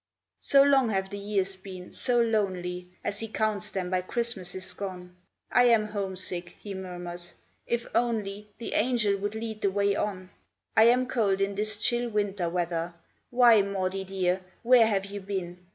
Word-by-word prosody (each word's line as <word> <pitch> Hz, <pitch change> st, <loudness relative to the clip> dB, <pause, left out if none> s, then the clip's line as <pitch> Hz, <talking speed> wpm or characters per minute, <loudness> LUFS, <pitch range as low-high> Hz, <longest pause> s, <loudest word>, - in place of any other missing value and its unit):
So 275 Hz, 0 st, +5 dB
long 275 Hz, -4 st, +4 dB
have 190 Hz, -2 st, -1 dB
the 200 Hz, -, -5 dB
years 195 Hz, -1 st, -1 dB
been, 185 Hz, -1 st, -10 dB
so 245 Hz, -2 st, +1 dB
lonely, 185 Hz, -6 st, 0 dB
As 200 Hz, -, -3 dB
he 225 Hz, -, -4 dB
counts 215 Hz, -2 st, -1 dB
them 185 Hz, -2 st, -3 dB
by 185 Hz, 0 st, +2 dB
Christmases 185 Hz, -4 st, -2 dB
gone. 180 Hz, -2 st, -7 dB, 0.4 s
"I 245 Hz, -, +5 dB
am 225 Hz, -3 st, +4 dB
homesick," 185 Hz, -3 st, -4 dB
he 205 Hz, -, -7 dB
murmurs; 175 Hz, -2 st, -6 dB, 0.3 s
"if 235 Hz, 0 st, -1 dB
only 210 Hz, -3 st, -1 dB
The 230 Hz, -, -5 dB
Angel 225 Hz, -3 st, +2 dB
would 205 Hz, +2 st, -3 dB
lead 220 Hz, -1 st, -5 dB
the 200 Hz, -, +3 dB
way 200 Hz, +1 st, +1 dB
on. 185 Hz, -3 st, -3 dB, 0.4 s
I 220 Hz, -, +7 dB
am 250 Hz, +2 st, +5 dB
cold, 215 Hz, -7 st, +1 dB
in 195 Hz, 0 st, 0 dB
this 210 Hz, +1 st, -1 dB
chill 240 Hz, +3 st, +1 dB
winter 205 Hz, -5 st, -1 dB
weather; 170 Hz, -1 st, -2 dB, 0.3 s
Why, 240 Hz, -3 st, +6 dB
Maudie, 195 Hz, -1 st, -2 dB
dear, 185 Hz, -1 st, 0 dB, 0.2 s
where 240 Hz, -1 st, +6 dB
have 195 Hz, -3 st, 0 dB
you 200 Hz, 0 st, -6 dB
been? 185 Hz, -3 st, -4 dB
200 Hz, 170 wpm, -28 LUFS, 185-220 Hz, 0.4 s, I